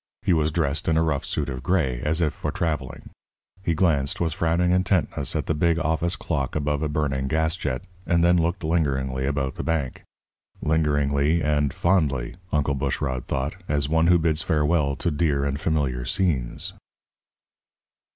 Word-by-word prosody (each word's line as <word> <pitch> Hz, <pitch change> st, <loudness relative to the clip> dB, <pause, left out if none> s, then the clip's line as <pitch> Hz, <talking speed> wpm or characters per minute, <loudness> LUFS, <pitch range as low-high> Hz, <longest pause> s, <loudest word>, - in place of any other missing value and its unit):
He 95 Hz, -, +3 dB
was 80 Hz, -1 st, +2 dB
dressed 75 Hz, -2 st, -1 dB
in 80 Hz, -, +3 dB
a 80 Hz, -, +3 dB
rough 75 Hz, -4 st, 0 dB
suit 75 Hz, -, -2 dB
of 65 Hz, -2 st, -5 dB
gray, 70 Hz, -6 st, 0 dB
as 80 Hz, +3 st, 0 dB
if 75 Hz, -3 st, +1 dB
for -, -, -3 dB
travelling. 75 Hz, -6 st, -3 dB, 0.5 s
He 85 Hz, -4 st, 0 dB
glanced 75 Hz, -6 st, +1 dB
with 80 Hz, -3 st, 0 dB
frowning 85 Hz, +2 st, +1 dB
intentness 90 Hz, -6 st, +1 dB
at -, -, -1 dB
the -, -, 0 dB
big 85 Hz, +2 st, +2 dB
office 85 Hz, +2 st, 0 dB
clock 70 Hz, -6 st, -2 dB
above 75 Hz, -1 st, 0 dB
the 75 Hz, 0 st, -1 dB
burning 70 Hz, -3 st, -1 dB
gas 80 Hz, +2 st, +1 dB
jet, 70 Hz, -5 st, -3 dB, 0.2 s
and 85 Hz, -1 st, +3 dB
then 90 Hz, +1 st, +5 dB
looked 85 Hz, +3 st, -1 dB
lingeringly 70 Hz, -5 st, 0 dB
about 70 Hz, -2 st, -2 dB
the -, -, -3 dB
bank 80 Hz, -6 st, -2 dB, 0.6 s
lingeringly 75 Hz, 0 st, +1 dB
and 75 Hz, -2 st, +1 dB
fondly, 75 Hz, -6 st, 0 dB
Uncle 75 Hz, -1 st, +1 dB
Bushrod 65 Hz, -2 st, -2 dB
thought, 65 Hz, +7 st, -2 dB
as 75 Hz, -1 st, +1 dB
one 80 Hz, +1 st, +3 dB
who 90 Hz, 0 st, +6 dB
bids 80 Hz, -1 st, +1 dB
farewell 75 Hz, -2 st, +1 dB
to 85 Hz, -, -1 dB
dear 75 Hz, -2 st, +1 dB
and 70 Hz, +1 st, -2 dB
familiar 70 Hz, -6 st, 0 dB
scenes. 65 Hz, -3 st, -1 dB
75 Hz, 170 wpm, -24 LUFS, 70-85 Hz, 0.6 s, who